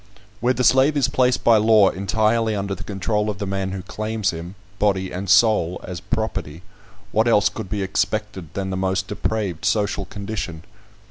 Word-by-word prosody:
Where 125 +3 +1
the 125 - 0
slave 135 +4 +4
is 135 - +3
placed 125 -1 +1
by 115 -1 +6
law 110 -2 +5
entirely 110 +3 +1
under 100 0 -2
the - - -7
control 105 +2 -1
of 105 - -3
the 100 - -3
man 95 -1 -2
who 95 -1 -5
claims 110 -1 -2
him, 85 +3 -8 0.2
body 95 -3 +1
and 95 +1 -5
soul, 95 -4 +4
as 90 -1 -6
property, 110 -8 -3 0.5
what 110 +2 +2
else 105 -3 +4
could 95 - -7
be 105 -2 -2
expected 95 -3 -2
than 95 -1 -3
the - - -2
most 95 0 -1
depraved 95 -5 -2
social 105 -2 0
condition? 100 -5 -6
100 Hz, 180 wpm, -22 LUFS, 95-110 Hz, 0.5 s, by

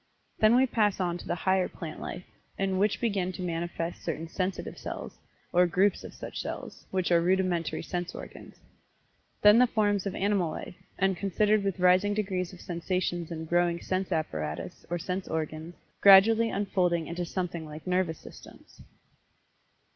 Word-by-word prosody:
Then 215 +2 +6
we 260 +1 +5
pass 210 -6 +1
on 175 -1 -1
to - - -10
the - - 0
higher 185 +1 +1
plant 155 -2 -8
life, - - -6 0.3
in 190 -1 0
which 205 +1 +2
begin 200 -6 0
to 185 - -6
manifest 170 0 -3
certain 165 0 -3
"sensitive 185 +3 -3
cells," - - -7 0.3
or 180 0 +5
groups 190 +3 +2
of - - -9
such - - -7
cells, - - -7
which 185 -2 -1
are 170 -1 +5
rudimentary 180 -2 0
sense 180 -1 -4
organs. - - -10 0.9
Then 210 +2 +8
the 250 - +6
forms 205 -4 +1
of 195 - -4
animal 195 -4 +1
life, - - -7 0.2
and 195 -1 +2
considered 205 +3 +2
with 195 -2 -1
rising 185 +3 +4
degrees 190 -4 -2
of 180 - -12
sensations 175 -1 -2
and 160 -1 -5
growing 175 0 +2
sense 190 +1 -2
apparatus, 80 - -3
or 175 - -1
sense 180 +2 -4
organs, 160 +1 -4 0.3
gradually 220 +4 +7
unfolding 180 -5 0
into 175 +2 -4
something 175 -1 -3
like 155 0 -9
nervous 180 -3 0
systems. - - -14
180 Hz, 160 wpm, -28 LUFS, 170-195 Hz, 0.9 s, Then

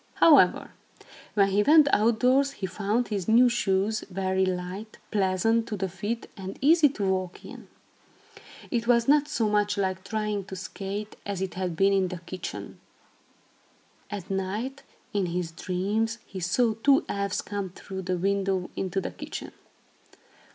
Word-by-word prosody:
However, 280 - +5 0.6
when 200 -2 +4
he 200 +2 +3
went 300 +5 +6
outdoors, 250 +5 +3
he 210 - -5
found 205 +6 -1
his 200 -4 -3
new 235 +3 +6
shoes 215 -2 0
very 190 0 0
light, 185 +4 -5
pleasant 215 +3 +1
to 210 - -4
the 190 0 -1
feet 205 +6 -4
and 190 -1 -7
easy 305 +2 +5
to 215 -7 -3
walk 185 -1 -2
in. - - -11 1.0
It 235 -2 -1
was 235 -1 +4
not 295 +1 +4
so 245 -8 0
much 205 0 +1
like 190 -1 -1
trying 210 -1 -2
to 190 - -8
skate, 200 +2 -6
as 200 -2 -4
it 190 -1 -3
had 185 -2 -3
been 195 +3 +3
in 190 -1 +2
the 180 0 -5
kitchen. 175 +2 -7 1.3
At 200 -3 -6
night, 210 +8 -3 0.3
in 200 -3 +1
his 170 -1 -3
dreams, 205 +7 -1
he 190 - -8
saw 220 +6 +2
two 270 +6 +3
elves 200 -1 -2
come 200 -2 -4
through 190 +1 -8
the 185 0 -2
window 195 0 0
into 190 0 -2
the - - -4
kitchen. - - -7
200 Hz, 155 wpm, -27 LUFS, 190-225 Hz, 1.3 s, went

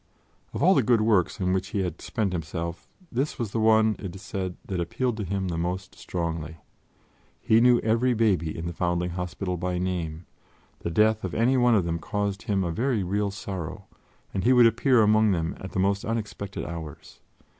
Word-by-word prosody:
Of - - -3
all 185 - +7
the 140 - +4
good 120 -1 +3
works 105 -5 +2
on 90 -1 +1
which 95 0 -1
he 100 - -2
had 90 -4 -4
spent 105 -4 -2
himself, 85 0 -4 0.2
this 135 +5 -1
was 115 -6 -3
the 115 - -1
one, 110 0 +4
it 95 -3 -6
is 95 - -10
said, 95 -3 -4
that 95 -2 -3
appealed 115 +8 -1
to 105 - -3
him 95 0 -2
the 85 -1 -2
most 90 +3 -3
strongly. 80 -2 -4 0.8
He 110 +1 +4
knew 125 0 +6
every 120 +3 +2
baby 95 -8 +1
in 80 - -5
the 85 - -3
Foundling 85 0 -1
Hospital 90 +1 -3
by 90 +1 -2
name; 90 -3 -3 0.5
the - - -3
death 110 +5 +3
of 95 - -4
any 120 +4 +3
one 120 -2 +4
of 95 -5 +2
them 85 0 -2
caused 100 +2 -2
him 100 -4 0
a 85 - -1
very 115 +3 0
real 100 +3 0
sorrow, 95 -4 -6 0.5
and 95 - -1
he 125 - +5
would 125 -1 +7
appear 115 +1 +4
among 110 -1 +4
them 80 -2 -2
at 95 - -8
the - - -1
most 100 +1 +1
unexpected 105 -3 -4
hours. 80 -4 -8
95 Hz, 200 wpm, -26 LUFS, 85-110 Hz, 0.8 s, all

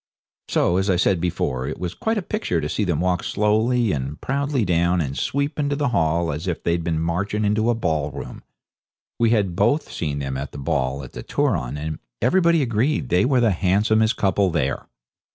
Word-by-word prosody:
So, 90 - +2
as 95 +1 0
I 95 - +4
said 90 -1 +2
before, 65 -7 -1
it 75 - -4
was 90 -1 -4
quite 225 - -1
a 205 - -2
picture 210 - -1
to 75 - -2
see 105 - -1
them 85 -5 0
walk 90 -1 0
slowly 110 +2 +1
and 70 0 -3
proudly 140 -3 -1
down 85 0 +2
and 70 -4 -2
sweep 140 - -1
into 145 -1 0
the 140 -1 0
hall 85 -6 +1
as 75 +6 -5
if 90 - -3
they'd 85 0 0
been 80 -1 -1
marching 100 +6 -1
into 110 +3 +2
a 120 - +2
ballroom. 75 -9 -3 0.8
We 115 -1 +4
had 100 -6 +1
both 120 - +1
seen 75 -3 -3
them 70 -2 -3
at 70 +1 -6
the - - -7
ball 70 0 -1
at 65 - -10
the - - -7
Turon, 75 - -1
and 75 +1 -4 0.2
everybody 170 - +3
agreed 125 +3 0
they 90 +1 +3
were 130 -1 +3
the 115 -3 +4
handsomest 105 +5 +2
couple 95 -1 +2
there. 75 -6 -1
95 Hz, 200 wpm, -22 LUFS, 80-115 Hz, 0.8 s, I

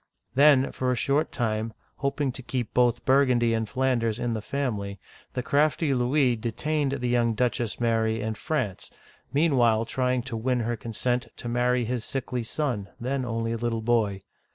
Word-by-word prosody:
Then, 140 -1 +5
for 130 -1 -1
a - - +1
short 140 +5 +1
time, 110 -1 -1 0.2
hoping 140 0 -1
to 130 - -7
keep 125 -2 -3
both 120 -2 +2
Burgundy 125 -4 +4
and 110 -1 -1
Flanders 125 -4 +1
in 120 -1 -1
the 110 - -3
family, 105 -7 -3 0.3
the 125 -1 -2
crafty 145 +1 +2
Louis 125 0 +2
de 115 +1 -3
tained 150 +1 -1
the 125 - 0
young 120 -2 +2
Duchess 120 -2 -1
Mary 115 -1 +1
in 110 +1 -2
France, 130 - -3 0.4
meanwhile 125 -7 +3
trying^ 125 +1 0
to 130 - -4
win 125 +2 0
her 120 +1 -1
consent 120 +2 -2
to - - -6
marry 125 +1 +1
his 120 0 -2
sickly 130 -1 -3
son, 115 -4 -2
then 130 +2 -1
only 115 -1 -2
a 115 - -1
little 115 -1 -2
boy. 110 -4 +1
120 Hz, 175 wpm, -26 LUFS, 115-130 Hz, 0.4 s, Then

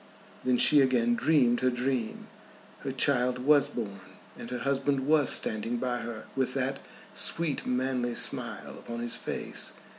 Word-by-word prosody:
Then 125 -1 +2
she 145 +3 +6
again 120 -3 +2
dreamed 125 -3 +3
her 130 - +2
dream. 125 -2 -2 0.5
Her 135 - -4
child 125 -1 +2
was 145 +3 +4
born, 100 -5 -6 0.3
and 115 - -9
her 125 - -3
husband 135 +1 0
was 150 -2 +4
standing 115 +2 +2
by 125 0 -2
her 115 -2 -7
with 130 -1 -1
that 135 0 -1 0.3
sweet 165 -4 0
manly 125 -1 -1
smile - - -2
upon 115 0 -7
his 120 0 -1
face. - - -4
125 Hz, 150 wpm, -28 LUFS, 120-135 Hz, 0.5 s, she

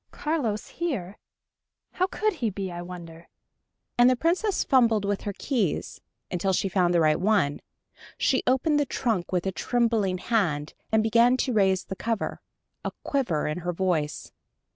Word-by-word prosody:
"Carlos 260 -10 -2
here? 215 - -4 0.7
How 370 - +1
could 430 +2 0
he 245 -9 -1
be, 195 -2 -4
I 175 0 -6
wonder?" 170 -2 -10 0.7
and 245 +1 +7
the 255 - +3
Princess 360 - +1
fumbled 230 -6 +3
with 200 0 -1
her 205 - -4
keys, 230 - -1 0.3
until 190 +2 0
she 195 - +1
found 180 -2 +2
the - - +5
right 155 -1 +3
one. 185 -7 +1 0.6
She 260 - +2
opened 295 +4 +3
the 290 - +2
trunk 220 -9 -1
with 180 -1 0
a 190 - 0
trembling 225 -3 +1
hand, 175 -9 0 0.2
and 220 0 +3
began 235 +3 +4
to 255 0 0
raise 190 -3 +3
the 190 - -6
cover, 225 +2 -3 0.4
a - - -1
quiver 235 - 0
in 150 +3 -2
her 175 0 -3
voice. 165 -5 -1
205 Hz, 165 wpm, -26 LUFS, 180-250 Hz, 0.7 s, and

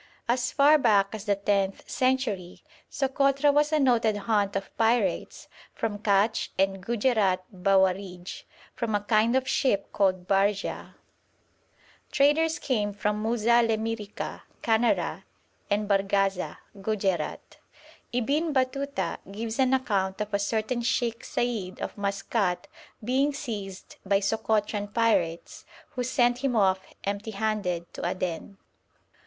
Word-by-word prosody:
As 245 +1 +1
far 295 +2 +5
back 205 -6 +3
as 215 -1 -6
the 205 -2 +2
tenth 195 -1 -1
century 255 -9 -1 0.3
Sokotra 275 +1 +2
was 295 +1 +3
a 310 - +3
noted 235 -6 +3
haunt 205 -1 0
of 195 0 -4
pirates 230 +1 0 0.3
from 210 -2 -3
Katch 210 +1 +2
and 195 -1 +1
Gujerat 210 -5 +1
Bawarij, 190 -1 0 0.3
from 230 -3 -2
a 205 - +1
kind 220 +3 +3
of 260 0 +1
ship 255 -7 0
called 185 -2 +1
barja. 200 +1 0 1.2
Traders 315 +3 +3
came 210 -6 -1
from 210 +1 -1
Muza 235 +1 +3
Lemyrica 225 -2 -3 0.2
(Canara) 230 +1 +1 0.5
and 205 0 0
Barggaza 195 -1 +1 0.2
(Gujerat). 195 -6 -2 0.5
Ibn 285 +7 0
Batuta 260 -7 -1
gives 220 +4 -5
an 260 -1 +3
account 195 -7 -1
of 210 0 -4
a 200 - +2
certain 220 +4 -1
Sheikh 235 -1 -1
Said 220 -7 -2
of - - -5
Maskat 200 -1 -1 0.4
being 270 +5 +1
seized 205 -9 -6
by 195 0 +2
Sokotran 210 0 -1
pirates, 195 -8 0 0.3
who 250 - -3
sent 245 -1 +2
him 265 -2 0
off 190 -3 +3 0.3
empty 200 +2 -3
handed 200 -5 -2
to - - -7
Aden. 180 +2 -3
215 Hz, 125 wpm, -27 LUFS, 195-245 Hz, 1.2 s, far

